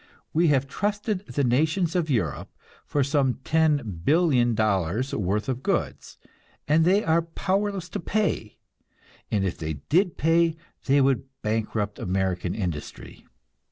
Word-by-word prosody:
We 165 +2 +3
have 140 -3 +3
trusted 205 - -2
the 145 - -1
nations 155 +8 +1
of 170 -3 0
Europe 100 - -1 0.4
for 145 - +1
some 140 -2 +1
$10,000,000,000 125 - +1
worth 105 +2 -1
of 130 -1 -2
goods, - - -2 0.5
and 155 +3 +4
they 195 +4 +4
are 165 +1 +3
powerless 190 +3 -2
to - - -4
pay, 195 - -1 0.7
and 100 -2 0
if 90 - -3
they 80 -1 -3 0.2
did 180 +2 +2
pay, 165 +1 +3 0.3
they 140 +1 +4
would 135 -1 +2 0.2
bankrupt 105 -1 -2
American 95 -1 -1
industry. 85 -8 -6
140 Hz, 125 wpm, -25 LUFS, 105-165 Hz, 0.7 s, and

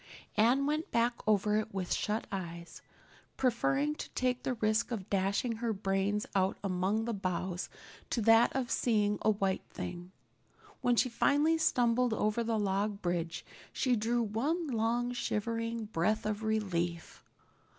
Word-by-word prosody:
Anne 245 +6 +4
went 305 +3 -1
back 235 +1 +2
over 210 0 +3
it 215 -1 -3
with 185 -2 -1
shut 215 +1 -1
eyes, 170 -3 -6 0.6
preferring 270 +4 +1
to - - -7
take 250 -1 0
the 255 - -2
risk 220 0 +1
of 220 -6 -4
dashing 200 +4 0
her 230 -1 -1
brains 195 +1 0
out 190 0 +1
among 195 +3 0
the 235 - -2
boughs 185 -2 -3 0.4
to - - 0
that 225 +2 +5
of 260 -3 -1
seeing 210 -3 +1
a 215 - +3
white 195 -2 +1
thing. 175 +1 -6 0.7
When 245 - +3
she 255 - +3
finally 290 +6 +2
stumbled 245 -4 +2
over 215 +2 0
the 230 -1 0
log 205 0 -1
bridge 175 -1 -2 0.3
she 255 -2 +1
drew 235 +2 +1
one 275 - -1
long 240 -1 0
shivering 230 -1 -2
breath 215 +2 0
of 210 0 -2
relief. 175 -6 -2
220 Hz, 150 wpm, -32 LUFS, 195-240 Hz, 0.7 s, that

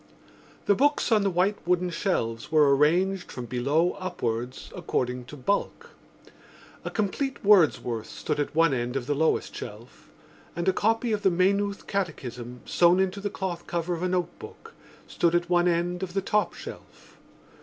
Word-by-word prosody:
The 205 - +5
books 290 +3 +2
on 215 -2 +5
the 200 - +2
white 190 +3 +1
wooden 180 0 +1
shelves 115 - -2
were 150 -3 +5
arranged 180 +6 +2
from 125 - -6
below 140 +9 +1
upwards 125 -9 -4
according 125 0 -2
to 145 +4 -10
bulk. 200 +10 -2 0.9
A - - -3
complete 230 +5 -2
Wordsworth 155 - +3
stood 150 -1 -3
at 145 - -2
one 165 -2 +4
end 120 0 -2
of 135 -3 -2
the 145 - 0
lowest 160 +3 +1
shelf - - -10 0.5
and 170 +1 -3
a 190 - +4
copy 225 +4 +1
of 210 -1 0
the 195 - +4
Maynooth 200 +3 +1
Catechism, 125 - -4
sewn 175 +1 +4
into 190 +1 0
the 205 - -2
cloth 185 -3 -5
cover 175 +1 -2
of 170 - -4
a 185 - 0
notebook, 180 - -5 0.3
stood 170 0 +1
at 175 +1 0
one 175 0 +4
end 175 +1 0
of 185 -1 -5
the 195 - +2
top 210 +1 0
shelf. - - -12
175 Hz, 165 wpm, -26 LUFS, 145-195 Hz, 0.9 s, The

